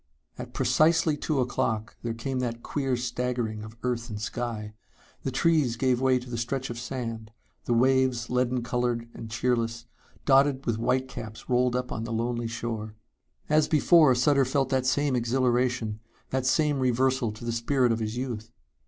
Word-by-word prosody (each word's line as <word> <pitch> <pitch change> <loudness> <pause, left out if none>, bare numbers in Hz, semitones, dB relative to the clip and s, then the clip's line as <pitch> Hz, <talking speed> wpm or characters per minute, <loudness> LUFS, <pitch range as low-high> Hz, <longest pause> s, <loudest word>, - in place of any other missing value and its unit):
At - - -8
precisely 160 0 +3
two 145 -2 -1
o'clock 115 -3 -1
there 115 -1 -3
came 130 +3 -3
that 120 -2 -3
queer 135 -3 -1
staggering 120 -3 -2
of 110 +1 -11
earth 120 -1 -2
and 105 -1 -5
sky. 110 -1 -4 0.5
The - - -2
trees 140 -2 +2
gave 125 +1 +1
way 130 -1 +4
to 125 0 -7
the 120 -2 -4
stretch 130 +2 -2
of 120 - -6
sand; 115 -3 -5 0.4
the 120 - +1
waves, 130 -1 +3
leaden 125 0 0
colored 120 -1 -1
and 115 - -8
cheerless, 115 0 -1 0.4
dotted 135 0 +4
with 115 -2 0
white 130 +2 +1
caps 110 -3 -8
rolled 125 0 +3
up 125 0 -2
on 110 - -3
the 115 - -5
lonely 120 +1 -1
shore. 115 -2 -4 0.5
As 155 0 +3
before 155 -3 +5
Sutter 140 +2 +4
felt 135 +1 0
that 130 -1 +1
same 145 0 +2
exhilaration, 120 -2 +1 0.3
that 130 -1 0
same 150 0 +2
reversal 130 -1 +1
to 110 +2 -10
the 115 - -1
spirit 120 +2 +1
of 115 - 0
his 110 +1 -3
youth. 120 -4 -4
125 Hz, 170 wpm, -27 LUFS, 115-130 Hz, 0.5 s, before